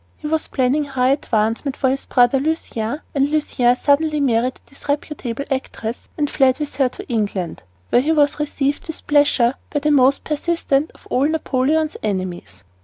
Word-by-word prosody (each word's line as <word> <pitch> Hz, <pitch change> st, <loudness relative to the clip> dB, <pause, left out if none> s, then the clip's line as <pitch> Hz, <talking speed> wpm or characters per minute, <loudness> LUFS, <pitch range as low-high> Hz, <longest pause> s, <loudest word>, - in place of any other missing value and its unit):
He -, -, -12 dB
was 315 Hz, +1 st, 0 dB
planning 270 Hz, +3 st, +1 dB
high 260 Hz, -2 st, +1 dB
advancement 240 Hz, 0 st, 0 dB
for 260 Hz, -1 st, +2 dB
his 275 Hz, -, -3 dB
brother 245 Hz, +1 st, +4 dB
Lucien, 285 Hz, -4 st, -2 dB
and 275 Hz, 0 st, +2 dB
Lucien 255 Hz, -5 st, +2 dB
suddenly 300 Hz, +3 st, +2 dB
married 250 Hz, -2 st, +1 dB
a -, -, -27 dB
disreputable 280 Hz, -3 st, -4 dB
actress 240 Hz, -3 st, -4 dB
and 295 Hz, -2 st, +1 dB
fled 265 Hz, -3 st, +3 dB
with 300 Hz, -1 st, -5 dB
her 265 Hz, -3 st, +3 dB
to -, -, -10 dB
England, 205 Hz, -7 st, -2 dB, 0.3 s
where 245 Hz, -, +5 dB
he 300 Hz, +5 st, 0 dB
was 295 Hz, -2 st, +2 dB
received 285 Hz, -1 st, -1 dB
with 320 Hz, -, -6 dB
pleasure 285 Hz, -5 st, +3 dB, 0.2 s
by 290 Hz, -, -1 dB
the 300 Hz, +1 st, +2 dB
most 275 Hz, -1 st, +4 dB
persistent 305 Hz, -1 st, 0 dB
of -, -, -21 dB
all 265 Hz, +3 st, +3 dB
Napoleon's 310 Hz, 0 st, 0 dB
enemies. 185 Hz, -, -4 dB
275 Hz, 170 wpm, -20 LUFS, 245-295 Hz, 0.3 s, where